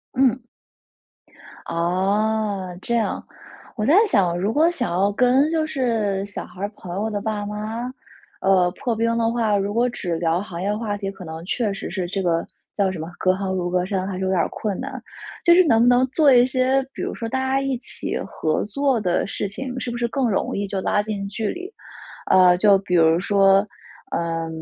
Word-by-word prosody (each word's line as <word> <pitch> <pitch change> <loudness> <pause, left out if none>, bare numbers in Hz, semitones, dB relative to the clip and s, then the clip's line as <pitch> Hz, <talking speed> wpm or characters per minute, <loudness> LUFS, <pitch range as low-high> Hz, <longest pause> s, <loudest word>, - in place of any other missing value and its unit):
嗯。 260 -1 +3 1.3
哦， 190 +2 -1
这 235 - -1
样。 225 -2 -1 0.5
我 215 -3 -2
在 290 - +4
想， 185 - +2
如 195 +4 0
果 310 +6 +4
想 245 - -2
要 190 +4 +2
跟 255 +7 +3
就 320 -1 +1
是 225 -9 -1
小 205 - -7
孩 185 - -13
儿 200 - -1
朋 175 -1 -8
友 210 +3 -1
的 205 -2 -3
爸 210 -1 -3
妈， 215 +4 -4 0.5
呃， 185 -2 +3
破 240 +3 -3
冰 230 +1 +1
的 230 0 +1
话， 225 -3 +1
如 200 +1 -2
果 235 +3 +2
只 180 -8 -3
聊 165 +1 0
行 180 -4 -7
业 205 +2 0
话 210 -2 -3
题， 195 -1 -4
可 195 -1 -11
能 160 0 -7
确 215 +2 -1
实 195 - -6
是 185 -1 -2
这 195 +2 -3
个 165 -2 +1 0.3
叫 195 -2 +1
什 185 - -6
么， 160 - -5
隔 185 0 +2
行 190 0 -3
如 180 -1 -1
隔 180 0 0
山 190 -1 -2
还 195 - -4
是 - - -5
有 190 - 0
点 190 -2 +1
儿 - - +2
困 205 -4 -4
难。 - - -5 0.5
就 345 - +7
是 365 +1 +7
能 225 -5 +4
不 240 - +4
能 245 +1 +4
做 280 +1 +4
一 245 0 +6
些 260 +1 +2
比 - - -7
如 - - -3
说 230 - -5
大 265 - -1
家 265 +1 0
一 270 -2 -1
起 240 - -5
合 155 -1 -1
作 270 +3 0
的 180 -4 0
事 200 - -3
情， 255 +5 -6
是 245 - -4
不 240 - -4
是 235 0 0
更 260 +1 0
容 195 - -1
易 200 0 -2
就 195 -1 -3
拉 205 +2 +1
近 205 -2 -4
距 215 +2 -3
离？ 365 +3 -6 0.6
呃， 180 -1 +6
就 200 +1 +5
比 185 -2 -2
如 165 0 +4
说 195 0 +4 0.5
呃， 165 -1 -2
205 Hz, 230 characters per minute, -22 LUFS, 185-240 Hz, 1.3 s, 就